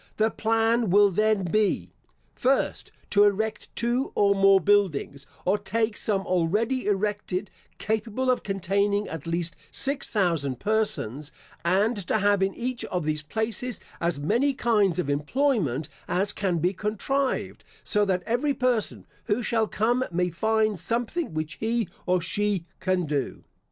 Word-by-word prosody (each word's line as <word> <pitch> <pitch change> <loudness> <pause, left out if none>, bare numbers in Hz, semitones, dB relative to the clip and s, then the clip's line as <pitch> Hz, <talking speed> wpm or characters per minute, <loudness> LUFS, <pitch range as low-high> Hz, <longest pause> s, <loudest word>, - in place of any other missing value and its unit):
The 220 +1 +2
plan 225 0 +1
will 200 +2 +5
then 215 +1 +2
be: 205 +4 0 0.4
First, 270 +1 0 0.2
To 205 0 +6
erect 210 +1 0
two 240 +3 0
or 200 -1 +4
more 195 0 +5
buildings, 170 -8 +1 0.2
or 200 +3 +2
take 220 +2 -1
some 200 -3 0
already 205 +9 0
erected, 205 -1 -1 0.3
capable 220 +4 -1
of 250 - 0
containing 200 +1 0
at 160 0 -7
least 170 -1 -1
six 275 0 0
thousand 165 - 0
persons, 205 - -1 0.3
and 195 +7 +2
to - - +2
have 205 -1 +2
in 195 0 +1
each 250 0 -3
of 180 -4 -3
these 155 0 0
places 220 +7 -2 0.2
as 170 -3 0
many 240 - +1
kinds 210 -8 +2
of 180 - -1
employment 150 - 0 0.2
as 200 +3 +1
can 185 -4 -1
be 175 +4 +1
contrived, 220 +7 -2 0.2
so 210 -1 +2
that 185 -3 0
every 265 +5 0
person 250 -4 0 0.2
who 215 +4 0
shall 220 -1 +1
come 240 +5 +1
may 180 +1 0
find 215 +2 +1
something 240 +8 -2
which 155 0 -4
he 230 0 0 0.2
or 180 0 +3
she 195 0 -1
can 185 -2 0
do. 145 -3 -3
205 Hz, 145 wpm, -26 LUFS, 180-225 Hz, 0.4 s, To